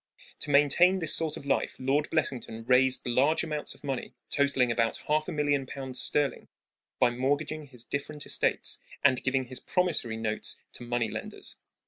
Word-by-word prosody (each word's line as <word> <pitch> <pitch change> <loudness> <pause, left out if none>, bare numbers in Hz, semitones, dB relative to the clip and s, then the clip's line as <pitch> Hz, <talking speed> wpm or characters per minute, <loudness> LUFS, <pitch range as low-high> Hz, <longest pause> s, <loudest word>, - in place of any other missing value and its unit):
To 150 - -2
maintain 150 +6 +5
this 165 -4 +4
sort 160 -2 +3
of - - -10
life 140 - 0
Lord 140 +3 0
Blessington 125 -7 -2
raised 130 +1 +3
large 135 +6 +2
amounts 150 -2 -3
of - - -20
money, 135 -3 -4 0.2
totaling 140 -4 +2
about 115 0 +1
half 155 +1 +1
a - - -3
million 145 -3 0
pounds 130 -2 -3
sterling, 145 -2 0 0.5
by 120 - +4
mortgaging 145 +4 -1
his 125 -3 -7
different 145 +3 -4
estates - - 0 0.2
and 130 -3 +4
giving 130 0 +1
his 130 0 -5
promissory 160 -11 0
notes 110 -1 -2
to - - -5
money 120 -2 -1
lenders. - - -6
140 Hz, 165 wpm, -29 LUFS, 125-150 Hz, 0.5 s, maintain